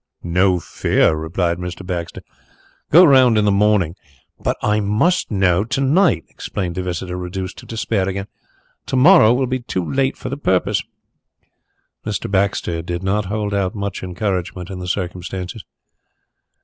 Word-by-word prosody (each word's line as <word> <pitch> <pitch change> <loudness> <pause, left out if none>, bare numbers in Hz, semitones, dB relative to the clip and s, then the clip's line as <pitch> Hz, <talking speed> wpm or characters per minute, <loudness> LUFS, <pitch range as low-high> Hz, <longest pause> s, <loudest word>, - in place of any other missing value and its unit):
No 90 +1 +2
fear!" 80 - +1
replied 85 +2 -1
Mr. 90 +1 -6
Baxter. 85 -2 -5 0.7
"Go 175 +5 +8
round 130 -6 +5
in 105 - +3
the 100 - +3
morning 100 -4 +2 0.3
" - - -42
"But - - 0
I 105 0 +2
must 105 - +1
know 95 -3 +2
to 120 - -2
night," 135 - +3
explained 90 -4 -5
the 95 - -3
visitor, 90 0 -4
reduced 90 +1 -5
to - - -13
despair 110 -4 -1
again. 95 +1 -4 0.6
"To - - -2
morrow 135 - +7
will 130 +2 +2
be 130 +1 -2
too 105 -7 -3
late 135 0 0
for - - -6
the 140 - -4
purpose." 95 -10 +1 1.2
Mr. 105 -3 -4
Baxter 95 -4 0
did 85 +2 -5
not 100 +2 0
hold 105 +1 -2
out 95 -1 -1
much 100 -1 -4
encouragement 90 -1 -3
in 95 - -6
the 90 - -6
circumstances. 90 +2 -4
95 Hz, 160 wpm, -19 LUFS, 90-110 Hz, 1.2 s, Go